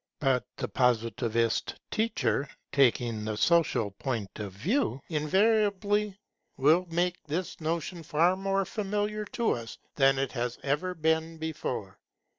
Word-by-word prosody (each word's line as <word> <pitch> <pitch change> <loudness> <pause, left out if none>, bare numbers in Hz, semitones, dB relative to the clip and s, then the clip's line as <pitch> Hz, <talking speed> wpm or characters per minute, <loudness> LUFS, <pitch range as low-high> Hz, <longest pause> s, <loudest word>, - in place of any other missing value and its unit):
But 135 -3 +1
the - - -2
Positivist 115 -2 +1 0.2
teacher, 140 - 0 0.2
taking 120 -5 +2
the 110 0 -3
social 165 -9 +3
point 110 -2 -4
of 105 -2 -4
view 180 - 0
invariably, 205 +4 +2 0.4
will 160 +7 +4
make 175 +2 0
this 170 +3 -3
notion 165 +2 -2
far 165 +4 +2
more 195 0 0
familiar 210 +1 -2
to 230 +2 0
us 115 -2 -4 0.2
than 135 -1 +5
it 135 -1 -1
has 120 -1 -2
ever 150 +7 -1
been 160 0 0
before. 160 -1 -4
160 Hz, 125 wpm, -29 LUFS, 125-190 Hz, 0.4 s, than